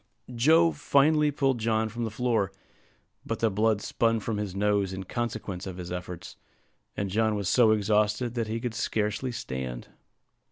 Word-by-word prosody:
Joe 160 Hz, +8 st, +5 dB
finally 150 Hz, +1 st, +3 dB
pulled 135 Hz, -3 st, +1 dB
John 110 Hz, 0 st, +1 dB
from 115 Hz, +2 st, -4 dB
the -, -, -2 dB
floor, 110 Hz, -3 st, 0 dB, 0.7 s
but -, -, -3 dB
the 115 Hz, -1 st, +1 dB
blood 105 Hz, +1 st, +2 dB
spun 115 Hz, +1 st, +1 dB
from 110 Hz, 0 st, -3 dB
his 100 Hz, -3 st, -4 dB
nose 100 Hz, -1 st, +1 dB
in 95 Hz, 0 st, -5 dB
consequence 105 Hz, -3 st, -4 dB
of 95 Hz, -1 st, -6 dB
his 90 Hz, -1 st, -7 dB
efforts; 90 Hz, -1 st, -7 dB, 0.6 s
and 100 Hz, -1 st, -2 dB
John 110 Hz, +1 st, +2 dB
was 100 Hz, -3 st, -2 dB
so 115 Hz, +3 st, +5 dB
exhausted 105 Hz, +2 st, +2 dB
that 115 Hz, -2 st, -2 dB
he 110 Hz, +1 st, -2 dB
could 120 Hz, -1 st, -3 dB
scarcely 105 Hz, +4 st, -1 dB
stand. 65 Hz, -, -5 dB
110 Hz, 165 wpm, -27 LUFS, 100-120 Hz, 0.7 s, Joe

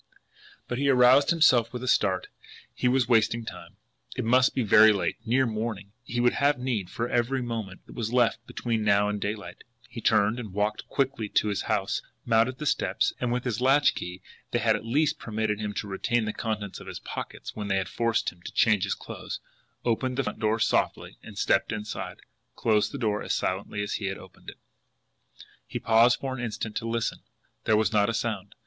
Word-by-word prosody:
But 120 Hz, -, -3 dB
he 140 Hz, 0 st, +2 dB
aroused 130 Hz, +2 st, +6 dB
himself 130 Hz, -9 st, +4 dB
with 125 Hz, 0 st, -6 dB
a -, -, -4 dB
start 95 Hz, -6 st, +2 dB, 0.5 s
he -, -, 0 dB
was 125 Hz, -1 st, +2 dB
wasting 115 Hz, -1 st, +2 dB
time! -, -, -10 dB, 0.4 s
It -, -, -2 dB
must 125 Hz, +2 st, +4 dB
be 130 Hz, -, +1 dB
very 110 Hz, +1 st, +7 dB
late, 100 Hz, -3 st, -1 dB
near 130 Hz, +3 st, +3 dB
morning, 110 Hz, -3 st, -4 dB, 0.2 s
and -, -, -8 dB
he -, -, +1 dB
would 120 Hz, 0 st, +3 dB
have 145 Hz, 0 st, +2 dB
need 125 Hz, -7 st, -2 dB
for 115 Hz, -, -3 dB
every 125 Hz, +2 st, 0 dB
moment 110 Hz, -6 st, -5 dB
that -, -, -13 dB
was 115 Hz, -2 st, -3 dB
left 120 Hz, -2 st, +2 dB
between 115 Hz, -2 st, -2 dB
now 100 Hz, 0 st, +3 dB
and 105 Hz, -1 st, -3 dB
daylight. 105 Hz, 0 st, -5 dB, 0.2 s
He -, -, -8 dB
turned, 105 Hz, +4 st, +3 dB
walked 105 Hz, +1 st, -1 dB
quickly 135 Hz, -6 st, -1 dB
to 105 Hz, -, +2 dB
his 100 Hz, -, -1 dB
house, 105 Hz, -1 st, 0 dB, 0.2 s
mounted 115 Hz, +2 st, +2 dB
the 150 Hz, -, -5 dB
steps, -, -, +1 dB
and 125 Hz, -1 st, -1 dB
with 125 Hz, 0 st, -1 dB
his 120 Hz, -2 st, -2 dB
latch 135 Hz, +3 st, +4 dB
key 90 Hz, +1 st, -7 dB, 0.3 s
they -, -, 0 dB
had -, -, +3 dB
at -, -, -5 dB
least 145 Hz, +5 st, +1 dB
permitted 110 Hz, -1 st, -2 dB
him 105 Hz, -1 st, -3 dB
to 105 Hz, -, -3 dB
retain 110 Hz, +4 st, 0 dB
the 105 Hz, -, -2 dB
contents 105 Hz, -4 st, -4 dB
of -, -, -12 dB
his -, -, -6 dB
pockets -, -, -7 dB
when 105 Hz, -1 st, -4 dB
they 95 Hz, -1 st, +1 dB
had 95 Hz, -, -1 dB
forced 115 Hz, -1 st, 0 dB
him 90 Hz, -, -22 dB
to -, -, -8 dB
change 105 Hz, -4 st, +3 dB
his -, -, -1 dB
clothes -, -, -7 dB, 0.5 s
opened 125 Hz, +2 st, 0 dB
the 135 Hz, -, +1 dB
front -, -, -5 dB
door 110 Hz, 0 st, +1 dB
softly, 115 Hz, -, 0 dB
and, -, -, -12 dB
stepping -, -, +1 dB
inside, 105 Hz, 0 st, -6 dB, 0.3 s
closed 105 Hz, -2 st, +2 dB
the 140 Hz, -, -5 dB
door 105 Hz, -5 st, 0 dB
as -, -, -1 dB
silently 105 Hz, -, -2 dB
as 105 Hz, -, -3 dB
he 105 Hz, -, -3 dB
had 95 Hz, -, -3 dB
opened -, -, -13 dB
it. -, -, -12 dB, 1.1 s
He -, -, -4 dB
paused 115 Hz, +2 st, +4 dB
for 135 Hz, -1 st, -3 dB
an 125 Hz, -, -5 dB
instant 110 Hz, -1 st, -4 dB
to 115 Hz, -1 st, -3 dB
listen. 115 Hz, -1 st, -1 dB, 0.5 s
There 110 Hz, -, +4 dB
was 110 Hz, -2 st, +1 dB
not 105 Hz, 0 st, +3 dB
a 115 Hz, -, -1 dB
sound. 105 Hz, -4 st, -3 dB
115 Hz, 210 wpm, -27 LUFS, 105-125 Hz, 1.1 s, very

